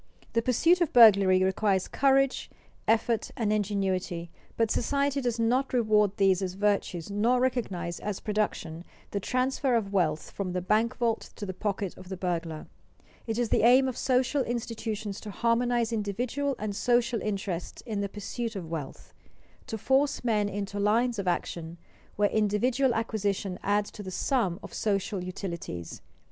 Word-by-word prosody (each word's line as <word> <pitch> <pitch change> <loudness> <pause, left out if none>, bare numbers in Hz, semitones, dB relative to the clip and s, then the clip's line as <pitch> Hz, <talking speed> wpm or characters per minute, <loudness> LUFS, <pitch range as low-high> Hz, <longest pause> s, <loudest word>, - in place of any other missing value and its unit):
The 230 - +2
pursuit 330 +10 +3
of 340 - +2
burglary 200 -5 +7
requires 190 0 +1
courage, 275 -1 +2 0.4
effort, 225 0 +1
and 215 -3 +1
ingenuity, 190 -4 -1 0.3
but 225 -1 +2
society 280 +2 0
does 240 -2 -1
not 250 +4 +1
reward 210 -4 +3
these 195 -1 +3
as 185 -1 -3
virtues 200 -3 0
nor 230 +5 +2
recognize 195 -10 -1
as 205 -2 -4
production 205 -6 -2 0.3
the 200 - -1
transfer 255 +3 0
of 200 -4 -1
wealth 160 -5 0
from 185 -3 -4
the 180 - -1
bank 225 +6 +1
vault 235 -2 -1
to 205 - -6
the 190 - -4
pocket 200 -1 -3
of 185 - -12
the 190 - -5
burglar. 170 -3 -3 0.6
It 225 -1 -2
is 240 -2 0
the - - +3
aim 255 +4 +6
of 255 - -3
social 260 +3 +1
institutions 225 -4 -3
to 215 - -7
harmonize 235 +2 +1
individual 245 +7 -1
and 210 -2 -4
social 240 0 +1
interests 195 -4 -4
in 215 -4 -2
the 200 - -2
pursuit 225 +3 -5
of 170 -4 -6
wealth, 150 -5 -6 0.5
to 220 - -4
force 265 +6 +1
men 210 -4 +1
into 205 0 -4
lines 225 +3 +2
of 195 - -3
action 170 -1 -2 0.4
where 205 0 +2
individual 235 +5 +2
acquisition 205 -4 -2
adds 205 +1 0
to - - -9
the 190 - -6
sum 195 -2 0
of - - -9
social 195 -2 -1
utilities. 170 - -6
210 Hz, 160 wpm, -28 LUFS, 190-240 Hz, 0.6 s, burglary